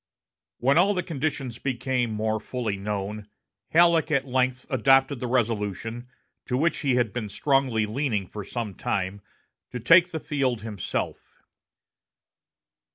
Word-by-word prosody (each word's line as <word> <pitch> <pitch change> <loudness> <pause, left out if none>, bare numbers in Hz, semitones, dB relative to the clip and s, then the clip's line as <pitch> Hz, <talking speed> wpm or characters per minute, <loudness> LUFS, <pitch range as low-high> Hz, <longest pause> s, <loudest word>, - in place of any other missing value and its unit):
When 140 +6 +3
all 200 +3 +4
the 180 - -1
conditions 140 -6 -3
became 130 -2 -1
more 110 0 -1
fully 115 -2 -3
known, 105 +1 -4 0.4
Halleck 170 -1 +4
at 140 -3 +1
length 130 -1 0
adopted 135 +1 +3
the 125 - -3
resolution, 115 0 -1 0.4
to 125 - 0
which 165 +5 +1
he 135 -4 +1
had 120 -5 +1
been 110 -4 -3
strongly 130 -1 +1
leaning 110 -3 -1
for 105 +3 -7
some 110 0 -4
time, 95 +1 -2 0.5
to 125 - -4
take 175 +10 +6
the 160 -2 -4
field 135 -8 -1
himself. 105 -5 -5
125 Hz, 135 wpm, -26 LUFS, 110-140 Hz, 0.5 s, take